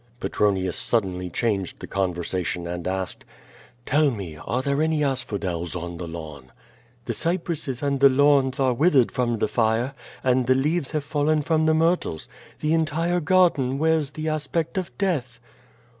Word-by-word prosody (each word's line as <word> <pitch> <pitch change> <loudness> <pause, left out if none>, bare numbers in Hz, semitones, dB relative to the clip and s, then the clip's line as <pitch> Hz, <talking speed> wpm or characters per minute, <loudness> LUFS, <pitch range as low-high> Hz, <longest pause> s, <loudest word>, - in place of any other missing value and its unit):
Petronius 95 -6 0
suddenly 90 -5 -1
changed 100 -1 -1
the - - -7
conversation 90 -2 -2
and 85 0 -4
asked: 95 0 -3 0.6
"Tell 150 +1 +3
me, 100 - -6
are 120 +11 -3
there 140 +2 0
any 155 -1 +1
asphodels 100 - -2
on 85 -1 -5
the 85 - -6
lawns?" 75 -5 -8 0.6
"The - - -2
cypresses 165 -7 -2
and 140 -1 0
the 140 0 +7
lawns 140 0 +3
are 130 -2 +3
withered 140 -2 +3
from 120 -2 0
the - - +1
fire, 115 +3 +1 0.3
and 125 -1 +2
the 130 - +5
leaves 145 +2 0
have 150 -2 -2
fallen 150 +1 +1
from 160 +1 +2
the 160 - +4
myrtles. 165 - 0 0.3
The 155 +1 +1
entire 165 +2 +1
garden 160 -6 +3
wears 160 -1 +2
the 155 +2 -5
aspect 155 +4 -1
of 180 -6 -5
death." 130 -12 -1
130 Hz, 160 wpm, -24 LUFS, 95-155 Hz, 0.6 s, the